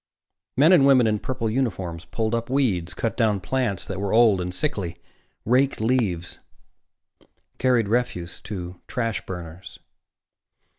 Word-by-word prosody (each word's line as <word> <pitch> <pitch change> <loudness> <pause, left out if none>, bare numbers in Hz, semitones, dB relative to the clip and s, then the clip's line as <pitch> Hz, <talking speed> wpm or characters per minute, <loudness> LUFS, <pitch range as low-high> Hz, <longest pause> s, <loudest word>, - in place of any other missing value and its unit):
Men 155 +7 +6
and 140 -6 +6
women 130 -3 +6
in 105 -1 +1
purple 120 -1 -3
uniforms 95 -9 -2
pulled 110 +6 -2
up 115 +1 -2
weeds, 110 -11 0
cut 115 - -2
down 110 -4 +2
plants 120 -2 -1
that 95 -1 -5
were 100 0 -2
old 110 -5 +5
and 90 0 -3
sickly, 90 - -3 0.5
raked 130 +4 +2
leaves, 110 -7 0 1.2
carried 125 -4 +2
refuse 105 -7 -1
to 90 -4 -6
trash 115 -4 -2
burners. 90 0 -8
110 Hz, 135 wpm, -24 LUFS, 90-125 Hz, 1.2 s, Men